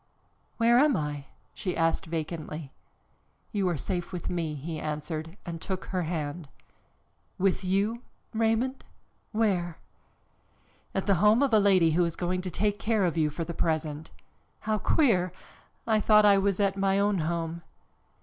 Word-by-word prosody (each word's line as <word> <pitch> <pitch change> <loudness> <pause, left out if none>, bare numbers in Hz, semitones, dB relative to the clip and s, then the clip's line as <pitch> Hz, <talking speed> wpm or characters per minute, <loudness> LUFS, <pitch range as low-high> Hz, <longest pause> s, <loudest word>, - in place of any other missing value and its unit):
"Where 235 +1 +5
am 290 -1 +4
I?" 145 -2 -3 0.3
she 185 -3 -3
asked 165 0 +1
vacantly. 155 -2 -5 0.8
"You 195 -3 +1
are 170 - -1
safe, 175 +5 -3
with 180 -1 -4
me," 165 -4 -2
he 155 +3 -5
answered 155 +3 -4
and 165 -2 -6
took 190 -1 -4
her 185 -1 -2
hand. 155 -2 -4 0.9
"With 190 +1 +1
you, 200 +5 0 0.3
Raymond? 225 +4 0 0.5
Where?" 190 -7 0 1.2
"At 195 - 0
the 200 - +4
home 215 +5 +5
of 270 -4 +1
a 215 - +7
lady 185 -5 +4
who 175 +3 +3
is 170 -1 -1
going 180 +1 -1
to 185 - -4
take 205 +3 -1
care 215 -2 +1
of 170 - 0
you 155 -2 +2
for 165 +3 -4
the 170 +1 -5
present." 155 -1 -2 0.5
"How 215 -1 0
queer! 190 - +2 0.5
I 220 -2 +3
thought 210 0 +5
I 200 -1 +6
was 195 0 +1
at 200 -1 +2
my 195 0 +2
own 200 -1 +2
home." 165 +1 -2
180 Hz, 160 wpm, -28 LUFS, 165-205 Hz, 1.2 s, a